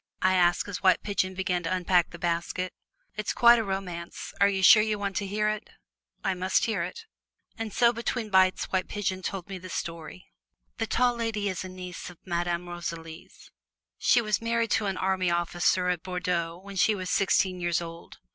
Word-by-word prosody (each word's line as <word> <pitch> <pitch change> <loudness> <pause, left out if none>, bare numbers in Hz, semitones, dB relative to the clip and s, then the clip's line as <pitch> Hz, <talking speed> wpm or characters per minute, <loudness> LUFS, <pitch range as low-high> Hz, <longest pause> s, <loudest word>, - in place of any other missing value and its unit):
I 185 0 +4
asked, 175 0 +3
as 200 -3 -5
White 190 -1 +4
Pigeon 190 -2 -1
began 185 -1 -1
to 165 - -3
unpack 180 -1 +2
the 175 - -10
basket. 175 +1 -2 0.4
"It's 210 0 -2
quite 240 -1 +7
a - - 0
romance; 185 -4 -5
are 200 - +6
you 190 -1 -1
sure 215 +3 +9
you 215 -1 0
want 200 -1 -3
to 200 - -2
hear 210 +2 0
it?" 215 -1 -3 0.5
"I 195 - +1
must 185 +1 +1
hear 220 -6 -1
it." 180 - -6 0.5
And 225 -2 -5
so 235 +3 +4
between 235 -1 -3
bites 185 -1 +4
White 190 -1 0
Pigeon 190 -2 -2
told 190 0 -4
me 195 -2 -6
the 185 +1 -10
story. 165 +1 -6 0.5
The 225 - -1
Tall 245 +2 +2
Lady 225 -3 -1
is 185 -1 -4
a 185 - -7
niece 180 -1 -8
of 180 - -13
Madame 175 0 -2
Rosalie's. 170 -2 -8 0.5
She 240 - +4
was 215 -1 0
married 230 -1 0
to 215 -2 +2
an 190 -1 -2
army 190 -1 +1
officer 175 +1 +1
at 180 -2 -1
Bordeaux 180 -2 -2
when 195 +1 -10
she 215 +3 +4
was 185 -2 -4
sixteen 190 -1 +2
years 175 -1 +1
old. 170 0 -9
185 Hz, 195 wpm, -27 LUFS, 175-205 Hz, 0.5 s, sure